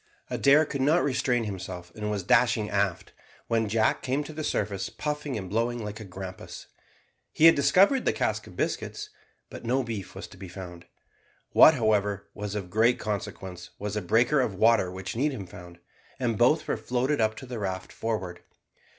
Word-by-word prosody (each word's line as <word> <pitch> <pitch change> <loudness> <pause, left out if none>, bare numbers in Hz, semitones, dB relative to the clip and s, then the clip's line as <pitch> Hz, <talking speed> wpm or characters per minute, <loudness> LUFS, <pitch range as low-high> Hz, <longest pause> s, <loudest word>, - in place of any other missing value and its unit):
Adair 145 +3 +5
could 140 -2 -4
not 155 +6 +3
restrain 125 -3 +1
himself, 95 -4 -6
and 105 0 -4
was 105 -2 -2
dashing 105 +1 +3
aft, 100 -3 -1 0.3
when 115 -2 0
Jack 110 +1 +2
came 135 +3 -1
to 155 - -9
the 155 +1 -5
surface 100 -7 -2
puffing 150 -3 -3
and 95 -3 -5
blowing 115 +3 -1
like 105 +1 -6
a - - -7
grampus. 95 -1 -8 0.7
He 155 - +3
had 165 - +10
discovered 195 - +4
the - - +3
cask - - -2
of - - -13
biscuits, 420 0 -3 0.4
but - - -9
no 130 +3 +1
beef 110 -6 -6
was - - -6
to - - -14
be 95 - -9
found. 90 -1 -9 0.6
What, 160 - +8
however, 105 -4 0
was 105 0 -5
of 95 -4 -5
great 115 +5 +3
consequence, 95 -4 -5
was 105 0 -4
a 105 - -1
breaker 120 +10 +3
of 110 -6 -1
water 110 -2 +4
which 95 +2 -6
Needham 130 -5 -1
found, 90 -1 -12 0.4
and 120 -3 0
both - - +3
were - - 0
floated 125 +2 0
up 110 0 +1
to 130 - -9
the 125 -2 -6
raft 95 -2 -4
forward. 95 -6 -4
110 Hz, 185 wpm, -27 LUFS, 95-130 Hz, 0.7 s, had